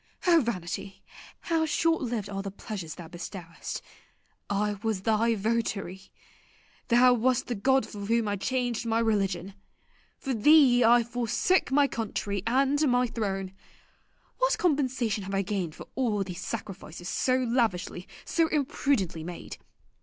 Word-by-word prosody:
O 340 -3 +6
vanity, 195 -4 -4 0.4
how 330 -1 +1
short 325 +1 +1
lived 235 -6 -2
are 195 -1 -4
the 195 - -5
pleasures 190 -5 -7
thou 170 0 -9
bestowest! 175 0 -7 0.7
I 205 0 0
was 220 -4 -1
thy 225 +1 +2
votary. 200 -3 -2 0.8
Thou 250 +1 +6
wast 245 +1 +1
the 245 - -3
god 265 +3 +2
for 200 -2 -7
whom 230 -1 +2
I 205 - 0
changed 245 +2 -1
my 225 0 +1
religion. 195 -5 0 0.6
For 270 - -3
thee 250 +1 +6
I 235 +1 +6
forsook 245 - +1
my 285 +1 +4
country 205 -4 -3
and 270 +4 +2
my 245 0 +3
throne. 195 -5 -3 0.9
What - - +2
compensation 260 - 0
have 195 0 -3
I 195 - +1
gained 185 -5 -3
for - - -9
all 220 -5 0
these 180 -2 -7
sacrifices 185 -6 -6
so 255 +5 +1
lavishly, 230 -8 -1 0.2
so 330 -1 +2
imprudently 265 - 0
made? 175 +1 -7
225 Hz, 140 wpm, -28 LUFS, 195-255 Hz, 0.9 s, O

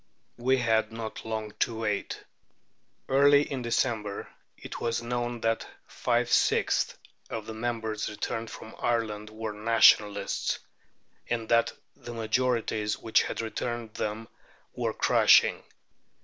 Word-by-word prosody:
We 130 +2 +3
had 110 -3 +1
not 115 -1 -6
long 110 -1 -3
to 115 -1 0
wait. 105 -2 -2 0.8
Early 145 +2 +5
in 135 -3 -4
December 115 -3 -1 0.3
it - - -8
was 115 0 -1
known 120 0 -2
that 115 0 0 0.2
five - - 0
sixths - - +2 0.3
of 110 -2 -5
the 110 - -6
members 110 -2 -2
returned 115 +2 -4
from 110 - -10
Ireland 110 -3 -1
were 110 0 -5
Nationalists, 105 -2 +3 0.7
and 115 -2 -1
that 115 0 +3 0.2
the 120 - -9
majorities 110 -2 0
which 110 - +3
had - - -3
returned 115 0 -4
them 110 +1 -3 0.5
were - - -2
crushing. - - +5
115 Hz, 120 wpm, -28 LUFS, 110-120 Hz, 0.8 s, Early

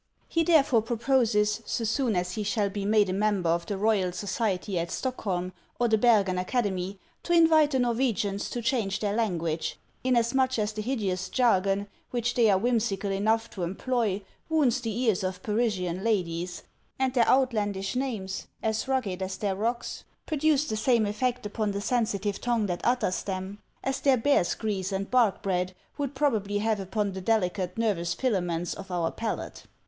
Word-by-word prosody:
He 330 - +1
therefore 285 -9 +4
proposes, 230 -2 +1
so 230 - -1
soon 225 0 +1
as 180 0 -1
he 215 - -3
shall 205 -1 0
be 200 -1 -3
made 210 0 +4
a 185 - -1
member 200 -4 +1
of 170 0 -1
the 200 - -2
Royal 205 -3 +2
•Society 195 0 -2
at 170 0 -1
Stockholm 185 -8 -3 0.3
or 240 - +3
the 220 -1 +3
Bergen 205 -6 +4
Academy, 195 -2 -1 0.2
to 345 - -1
invite 320 -3 +6
the 270 - 0
Norwegians 230 -5 0
to 240 - -4
change 225 -5 0
their 205 -2 -1
language, 170 -7 -1 0.3
inasmuch 255 +1 +2
as 215 0 -1
the 215 - -4
hid 255 +5 -1
eous 185 -2 -2
jargon 200 -5 +2 0.2
which 245 0 -1
they 230 -3 +4
are 195 - +5
whimsical 210 -3 0
enough 220 +3 +1
to 190 - -7
employ 205 +2 -1 0.3
wounds 275 -6 +2
the 230 - -3
ears 220 -7 +2
of 185 0 -3
Parisian 200 -5 -1
ladies, 180 -5 -1 0.3
and 260 -1 0
their 240 -3 +3
outlandish 210 -6 +1
names, 220 -8 -3 0.2
as 220 +2 -1
rugged 220 -9 -1
as 190 0 -3
their 200 -1 -1
rocks, 235 +4 -2 0.2
produce 305 -1 +2
the 215 - -2
same 230 -1 +3
effect 245 +3 -1
upon 210 0 -1
the 200 - -2
sensitive 205 -3 -1
tongue 235 -3 +1
that 175 -3 -3
utters 240 -6 +1
them, 190 +1 -5 0.2
as 270 0 -1
their 270 -2 +4
bear's 225 -7 +2
grease 200 -3 -2
and 195 0 -3
bark 240 -6 +3
bread 185 -1 -1 0.2
would 285 -1 -2
probably 220 -8 +1
have 215 0 0
upon 200 +1 -1
the 190 0 -6
deli 195 -2 +2
cate 180 0 -4
nervous 195 -7 0
filaments 175 -8 -1
of 190 - -9
our 175 -2 0
palate. 225 -1 -5
210 Hz, 175 wpm, -27 LUFS, 190-240 Hz, 0.3 s, invite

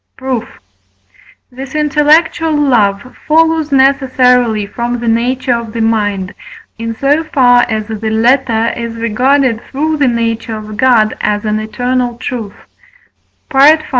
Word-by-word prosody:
Proof. 255 -3 -5 0.9
This 265 +3 -9
intellectual 305 +2 +2
love 240 -5 0
follows 320 -1 +2
necessarily 255 -5 +2
from 240 +4 -4
the 235 - -5
nature 245 +3 0
of 235 -2 -4
the 230 - -3
mind, 205 -4 -1 0.5
in 230 0 -4
so 285 +6 +1
far 250 -6 +3
as 215 -1 -2
the 220 0 -4
latter 230 0 +1
is 230 -1 -5
regarded 235 +2 +1
through 310 +3 -1
the 285 -2 +2
nature 230 -2 -2
of 215 0 -9
God 230 -3 +2
as 205 +1 -1
an 215 0 -1
eternal 245 +2 -2
truth 230 -5 -6 1.0
(V. 280 +3 +6
245 Hz, 130 wpm, -13 LUFS, 225-275 Hz, 1.0 s, V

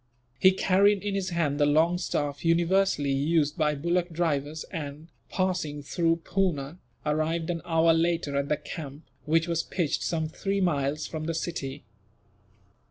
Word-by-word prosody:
He 185 - +7
carried 195 +2 +3
in 205 -1 -2
his 195 -1 -1
hand 160 -5 0
the 145 - +4
long 165 +4 +3
staff 145 -5 -2
universally 170 -3 +2
used 150 +2 +1
by 150 -3 +1
bullock 170 +4 0
drivers 155 -2 -1
and, 150 +1 -6 0.2
passing 175 -6 -1
through 165 +2 0
Poona, 175 -4 -1 0.3
arrived 160 +2 0
an 165 -1 -4
hour 165 0 +4
later 165 -3 0
at 140 0 0
the 150 - +2
camp, 150 -1 -8 0.2
which 165 +2 +2
was 170 -1 +1
pitched 170 -4 -1
some 160 -2 -1
three 195 +5 -2
miles 150 -5 0
from 155 -1 -5
the 165 0 -2
city. 140 -6 -4
165 Hz, 155 wpm, -27 LUFS, 150-175 Hz, 0.3 s, He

